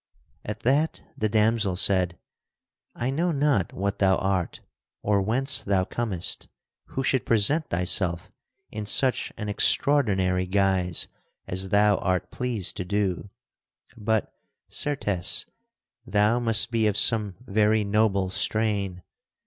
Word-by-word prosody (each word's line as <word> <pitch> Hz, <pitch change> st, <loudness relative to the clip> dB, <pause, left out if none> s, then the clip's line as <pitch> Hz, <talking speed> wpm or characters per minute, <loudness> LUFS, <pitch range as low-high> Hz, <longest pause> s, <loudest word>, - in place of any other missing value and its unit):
At -, -, -6 dB
that 145 Hz, +6 st, 0 dB
the 110 Hz, -, -1 dB
damsel 110 Hz, -2 st, +1 dB
said: 90 Hz, -2 st, +2 dB, 0.8 s
"I 125 Hz, +2 st, -2 dB
know 170 Hz, +5 st, 0 dB
not 140 Hz, -, +1 dB
what 100 Hz, +1 st, -3 dB
thou 95 Hz, -1 st, +3 dB
art 95 Hz, -3 st, -2 dB, 0.4 s
or 100 Hz, -1 st, +2 dB
whence 130 Hz, +7 st, 0 dB
thou 95 Hz, -2 st, 0 dB
comest 95 Hz, -4 st, -2 dB, 0.4 s
who 135 Hz, -, -4 dB
should 130 Hz, 0 st, +1 dB
present 130 Hz, +9 st, +2 dB
thyself 85 Hz, 0 st, +1 dB, 0.4 s
in 105 Hz, -1 st, -6 dB
such 130 Hz, +3 st, +1 dB
an 105 Hz, -, -5 dB
extraordinary 100 Hz, -6 st, +2 dB
guise 95 Hz, -3 st, +1 dB, 0.4 s
as 95 Hz, +1 st, -3 dB
thou 105 Hz, 0 st, +3 dB
art 90 Hz, 0 st, -2 dB
pleased 120 Hz, -7 st, -2 dB
to -, -, -2 dB
do, 100 Hz, 0 st, -2 dB, 0.7 s
but, 110 Hz, -1 st, -1 dB, 0.4 s
certes, 105 Hz, -11 st, -1 dB, 0.6 s
thou 110 Hz, 0 st, +2 dB
must 115 Hz, -2 st, +2 dB
be 115 Hz, -2 st, +2 dB
of 105 Hz, -1 st, 0 dB
some 105 Hz, -3 st, +3 dB
very 105 Hz, 0 st, +2 dB
noble 100 Hz, -2 st, +1 dB
strain. 100 Hz, -4 st, -1 dB
105 Hz, 125 wpm, -25 LUFS, 95-115 Hz, 0.8 s, thou